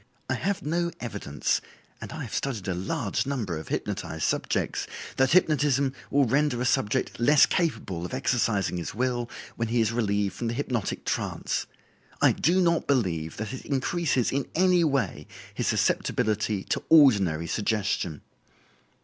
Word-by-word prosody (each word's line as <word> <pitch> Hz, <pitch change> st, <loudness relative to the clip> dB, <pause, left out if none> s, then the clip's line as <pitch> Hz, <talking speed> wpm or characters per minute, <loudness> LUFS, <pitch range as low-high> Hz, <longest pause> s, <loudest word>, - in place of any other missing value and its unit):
I -, -, 0 dB
have 200 Hz, 0 st, -2 dB
no 170 Hz, +3 st, 0 dB
evidence 105 Hz, -11 st, -2 dB, 0.4 s
(and -, -, -7 dB
I -, -, -5 dB
have -, -, -8 dB
studied 115 Hz, -9 st, -2 dB
a 95 Hz, -, 0 dB
large 90 Hz, +8 st, -2 dB
number 115 Hz, -11 st, -2 dB
of 80 Hz, -, -10 dB
hypnotized -, -, -3 dB
subjects) -, -, -1 dB, 0.3 s
that 130 Hz, +2 st, +3 dB
hypnotism 140 Hz, -6 st, +3 dB, 0.2 s
will 140 Hz, -1 st, +3 dB
render 135 Hz, +1 st, +1 dB
a 125 Hz, -, -1 dB
subject 125 Hz, +1 st, 0 dB
less 145 Hz, +5 st, +6 dB
capable 110 Hz, -, -1 dB
of 90 Hz, -, -5 dB
exercising 115 Hz, -7 st, 0 dB
his 85 Hz, +2 st, -5 dB
will 120 Hz, 0 st, -1 dB, 0.3 s
when 115 Hz, -, -1 dB
he 120 Hz, +2 st, +1 dB
is 110 Hz, -1 st, +2 dB
relieved 105 Hz, -4 st, 0 dB
from 120 Hz, -, -4 dB
the 115 Hz, -, -2 dB
hypnotic 125 Hz, -6 st, -2 dB
trance. -, -, -2 dB, 0.5 s
I -, -, +5 dB
do 175 Hz, +5 st, +2 dB
not 170 Hz, -2 st, +2 dB
believe 85 Hz, -, 0 dB
that 110 Hz, +2 st, -4 dB
it 130 Hz, -, -7 dB
increases 140 Hz, -1 st, 0 dB
in 140 Hz, 0 st, -1 dB
any 180 Hz, 0 st, +4 dB
way 125 Hz, -, 0 dB, 0.3 s
his -, -, -2 dB
susceptibility 105 Hz, -3 st, +1 dB
to -, -, -2 dB
ordinary 100 Hz, -, +5 dB
suggestion." 100 Hz, -6 st, -1 dB
120 Hz, 155 wpm, -27 LUFS, 100-140 Hz, 0.5 s, less